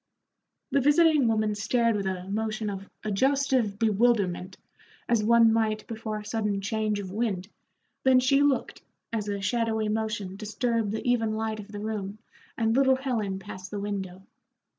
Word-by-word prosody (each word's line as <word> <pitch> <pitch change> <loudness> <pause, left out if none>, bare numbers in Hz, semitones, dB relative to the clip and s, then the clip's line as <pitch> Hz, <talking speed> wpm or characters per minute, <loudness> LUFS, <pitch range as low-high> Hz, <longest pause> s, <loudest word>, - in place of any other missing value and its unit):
The 280 +1 +3
visiting 295 -1 +4
woman 215 -1 +1
stared 230 +2 +1
with 200 -2 -1
a 185 -1 -4
motion 215 +1 -2
of 195 0 -7
adjustive 255 0 +1
bewilderment, 205 -4 +1 0.5
as 235 -3 +2
one 230 0 +5
might 215 -1 0
before 220 -1 -5
a 210 - -8
sudden 210 -3 -1
change 215 +1 -1
of 190 -2 -6
wind, 200 -4 -2 0.6
then 260 -1 +6
she 275 +2 +3
looked, 285 -2 +1 0.3
as 215 -2 -2
a 200 -1 -2
shadowy 220 0 0
motion 215 -3 -2
disturbed 225 +1 -1
the 220 +3 -4
even 225 -3 +1
light 220 0 -2
of 205 - -8
the 205 - -6
room 210 -1 -4 0.4
and 225 0 +1
little 265 -1 +4
Ellen 215 -7 -1
passed 185 -1 -9
the 205 - -4
window. 190 -2 -4
215 Hz, 160 wpm, -27 LUFS, 205-235 Hz, 0.6 s, then